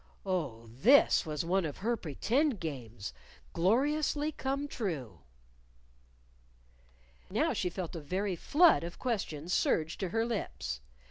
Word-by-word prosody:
Oh, 150 Hz, -12 st, -2 dB
this 160 Hz, -, +4 dB
was 150 Hz, +1 st, -2 dB
one 190 Hz, +2 st, +2 dB
of 150 Hz, -3 st, -4 dB
her 235 Hz, +4 st, 0 dB
pretend 230 Hz, -, 0 dB
games, 120 Hz, -, -6 dB, 0.4 s
gloriously 290 Hz, -, +2 dB
come 275 Hz, 0 st, -2 dB
true! 150 Hz, -, -4 dB, 2.1 s
Now -, -, +1 dB
she 180 Hz, -, -1 dB
felt 180 Hz, -1 st, -5 dB
a 165 Hz, -, -5 dB
very 185 Hz, +5 st, -1 dB
flood 310 Hz, -, +5 dB
of 170 Hz, +1 st, -6 dB
questions 180 Hz, -, -2 dB
surge 160 Hz, 0 st, +1 dB
to 190 Hz, -, -2 dB
her 225 Hz, +5 st, +1 dB
lips. 65 Hz, -, -3 dB
185 Hz, 125 wpm, -32 LUFS, 150-240 Hz, 2.1 s, flood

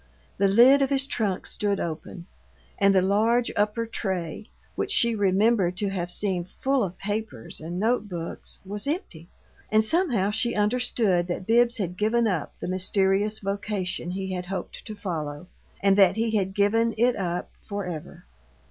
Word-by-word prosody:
The 200 Hz, -, +4 dB
lid 245 Hz, +8 st, +6 dB
of 270 Hz, -, +2 dB
his 275 Hz, -1 st, +1 dB
trunk 210 Hz, -9 st, -1 dB
stood 205 Hz, -1 st, -1 dB
open, 170 Hz, +2 st, -5 dB, 0.5 s
and 200 Hz, 0 st, +4 dB
the 185 Hz, -, +4 dB
large 225 Hz, +5 st, +2 dB
upper 210 Hz, +3 st, 0 dB
tray, 190 Hz, -5 st, -4 dB, 0.2 s
which -, -, -2 dB
she 235 Hz, -1 st, +4 dB
remembered 200 Hz, -2 st, +2 dB
to 205 Hz, 0 st, -1 dB
have 180 Hz, -3 st, -3 dB
seen 185 Hz, -1 st, 0 dB
full 265 Hz, +8 st, -1 dB
of 185 Hz, -2 st, -4 dB
papers 210 Hz, -, -4 dB
and 170 Hz, +3 st, -5 dB
note 220 Hz, 0 st, +1 dB
books, 170 Hz, -2 st, -6 dB
was 205 Hz, +5 st, -4 dB
empty. 285 Hz, -, -4 dB, 0.4 s
And 215 Hz, 0 st, +4 dB
somehow 230 Hz, -, +1 dB
she 230 Hz, +3 st, 0 dB
understood 210 Hz, -4 st, +1 dB
that 180 Hz, +1 st, -4 dB
Bibbs 235 Hz, +2 st, +3 dB
had 180 Hz, -4 st, -3 dB
given 230 Hz, +3 st, +2 dB
up 180 Hz, -8 st, -2 dB
the -, -, -5 dB
mysterious 195 Hz, +3 st, +1 dB
vocation 200 Hz, -3 st, -3 dB
he 190 Hz, +1 st, -3 dB
had 180 Hz, -1 st, -4 dB
hoped 195 Hz, 0 st, -6 dB
to 215 Hz, -, -6 dB
follow 155 Hz, -6 st, -4 dB, 0.4 s
and 195 Hz, -1 st, +5 dB
that 190 Hz, -3 st, +6 dB
he 225 Hz, 0 st, 0 dB
had 190 Hz, -2 st, 0 dB
given 225 Hz, +3 st, +2 dB
it 245 Hz, +2 st, +3 dB
up 180 Hz, -2 st, -3 dB
for 200 Hz, -2 st, -5 dB
ever. 165 Hz, -, -7 dB
200 Hz, 165 wpm, -26 LUFS, 185-225 Hz, 0.5 s, lid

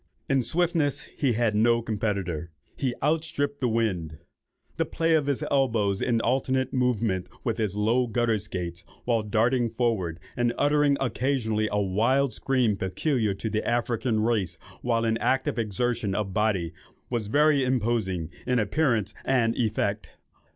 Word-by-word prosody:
In 135 Hz, -1 st, +2 dB
swiftness 160 Hz, 0 st, +1 dB
he 135 Hz, -5 st, +1 dB
had 115 Hz, -1 st, +1 dB
no 115 Hz, +2 st, +3 dB
competitor; 100 Hz, -7 st, -2 dB, 0.3 s
he 130 Hz, -3 st, -1 dB
outstripped 150 Hz, -2 st, 0 dB
the 125 Hz, -, +2 dB
wind; 95 Hz, -9 st, -1 dB, 0.6 s
the -, -, +2 dB
play 165 Hz, 0 st, 0 dB
of 150 Hz, -3 st, +2 dB
his 140 Hz, -2 st, 0 dB
elbows 115 Hz, -8 st, +1 dB
in 120 Hz, -2 st, +1 dB
alternate 130 Hz, 0 st, 0 dB
movement 115 Hz, -7 st, 0 dB, 0.2 s
with 115 Hz, -2 st, -1 dB
his 105 Hz, -3 st, -1 dB
low 115 Hz, +4 st, +2 dB
gutter 115 Hz, -1 st, +1 dB
skaites, 90 Hz, -4 st, -5 dB, 0.2 s
while 115 Hz, -2 st, +2 dB
darting 115 Hz, +3 st, +1 dB
forward 110 Hz, -8 st, -1 dB, 0.2 s
and 120 Hz, -1 st, +1 dB
uttering 145 Hz, -1 st, +3 dB
occasionally 120 Hz, -4 st, 0 dB
a 105 Hz, -, +1 dB
wild 115 Hz, +8 st, +2 dB
scream 125 Hz, -6 st, +1 dB
peculiar 105 Hz, -, 0 dB
to 110 Hz, -, -4 dB
the 110 Hz, 0 st, -1 dB
African 120 Hz, -1 st, 0 dB
race 105 Hz, -7 st, 0 dB, 0.2 s
while 115 Hz, -1 st, +1 dB
in 115 Hz, 0 st, +1 dB
active 130 Hz, -2 st, 0 dB
exertion 110 Hz, -1 st, -1 dB
of 100 Hz, -3 st, -2 dB
body, 95 Hz, -5 st, 0 dB, 0.4 s
was 115 Hz, -4 st, -1 dB
very 145 Hz, +3 st, +4 dB
imposing 110 Hz, -9 st, 0 dB, 0.2 s
in 125 Hz, 0 st, +2 dB
appearance 110 Hz, -, +1 dB
and 115 Hz, -4 st, +2 dB
effect. 110 Hz, -2 st, -1 dB
115 Hz, 145 wpm, -26 LUFS, 105-130 Hz, 0.6 s, very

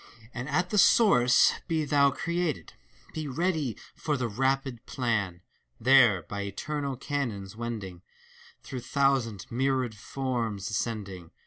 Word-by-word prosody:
And 125 Hz, +3 st, -5 dB
at 180 Hz, +5 st, 0 dB
the 210 Hz, -, +3 dB
source 150 Hz, -, +5 dB
be 160 Hz, -2 st, 0 dB
thou 140 Hz, -1 st, +4 dB
created! 170 Hz, +1 st, -2 dB, 0.4 s
Be 155 Hz, -2 st, -4 dB
ready 155 Hz, -, -1 dB, 0.2 s
for 150 Hz, -2 st, -2 dB
the 125 Hz, -2 st, -1 dB
rapid 130 Hz, +1 st, -1 dB
plan! 105 Hz, -9 st, -1 dB, 0.4 s
There, 120 Hz, -7 st, +5 dB
by 100 Hz, +5 st, -5 dB
eternal 140 Hz, +8 st, -3 dB
canons 115 Hz, -9 st, -3 dB
wending. 110 Hz, -6 st, -5 dB, 0.6 s
Through 130 Hz, -, -6 dB
thousand, 125 Hz, -5 st, 0 dB
myriad 130 Hz, -1 st, 0 dB
forms 115 Hz, -2 st, -3 dB
ascending. 100 Hz, -6 st, -4 dB
125 Hz, 120 wpm, -28 LUFS, 110-140 Hz, 0.6 s, source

